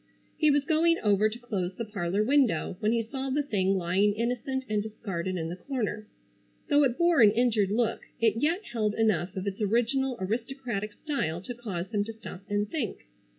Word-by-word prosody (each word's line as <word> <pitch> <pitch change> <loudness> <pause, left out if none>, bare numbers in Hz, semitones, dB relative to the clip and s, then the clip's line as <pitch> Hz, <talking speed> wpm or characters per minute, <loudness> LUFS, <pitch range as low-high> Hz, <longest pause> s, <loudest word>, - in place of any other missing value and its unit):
He 310 - +3
was 290 -1 +3
going 330 +2 +3
over 210 0 +4
to 220 - -7
close 195 -7 -3
the 230 - -4
parlor 200 -1 -1
window, 250 - +2
when 215 -1 +1
he 230 -1 +1
saw 265 +4 -4
the 290 +2 +1
thing 195 -7 +1
lying 190 +4 +2
innocent 250 +3 -1
and 210 -1 0
discarded 190 -4 -4
in 165 -2 -3
the 175 - -4
corner. 215 -1 -3 0.6
Though 290 -1 +5
it 250 -2 0
bore 340 -5 +4
an 215 - +9
injured 220 -3 +2
look, 225 +2 0 0.2
it 225 -1 +3
yet 330 - +1
held 215 -3 0
enough 195 -4 +1
of 190 0 -3
its 200 +1 -3
original 240 +5 +1
aristocratic 225 0 -3
style 205 - -2
to 245 - -6
cause 205 -6 -5
him 205 -1 +2
to 225 - -6
stop 215 -4 -9
and 205 0 0
think. 240 - -4
220 Hz, 195 wpm, -28 LUFS, 200-260 Hz, 0.6 s, an